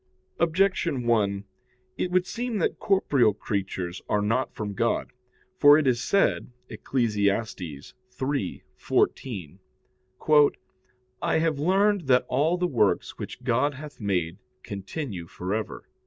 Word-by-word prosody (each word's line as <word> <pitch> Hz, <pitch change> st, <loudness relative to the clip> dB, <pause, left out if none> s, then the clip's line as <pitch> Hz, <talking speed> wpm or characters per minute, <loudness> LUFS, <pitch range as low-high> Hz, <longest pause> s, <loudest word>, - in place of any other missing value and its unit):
Objection 170 Hz, -5 st, +1 dB
1: 100 Hz, -4 st, +1 dB, 0.5 s
It 180 Hz, -, -2 dB
would 180 Hz, 0 st, +2 dB
seem 240 Hz, +2 st, -3 dB
that 180 Hz, -, -1 dB
corporeal 140 Hz, -, +3 dB
creatures 95 Hz, -4 st, -3 dB
are 105 Hz, -1 st, +1 dB
not 115 Hz, +5 st, 0 dB
from 105 Hz, -2 st, -5 dB
God. 115 Hz, +4 st, -1 dB, 0.5 s
For 145 Hz, 0 st, +8 dB
it 155 Hz, -, +1 dB
is 120 Hz, -2 st, +2 dB
said 200 Hz, -, +1 dB, 0.2 s
(Eccles. 120 Hz, -5 st, -1 dB
3:14): 100 Hz, -, -2 dB, 1.6 s
"I -, -, +1 dB
have 160 Hz, -3 st, 0 dB
learned 195 Hz, +1 st, +2 dB
that 125 Hz, -1 st, +4 dB
all 150 Hz, +7 st, +1 dB
the 180 Hz, -, 0 dB
works 120 Hz, -, +1 dB
which 125 Hz, -, -7 dB
God 130 Hz, +3 st, +1 dB
hath 150 Hz, +1 st, -10 dB
made, 90 Hz, -4 st, -1 dB, 0.2 s
continue 100 Hz, -, -6 dB
for 90 Hz, +3 st, -4 dB
ever." 110 Hz, -1 st, -4 dB
125 Hz, 120 wpm, -26 LUFS, 100-160 Hz, 1.6 s, For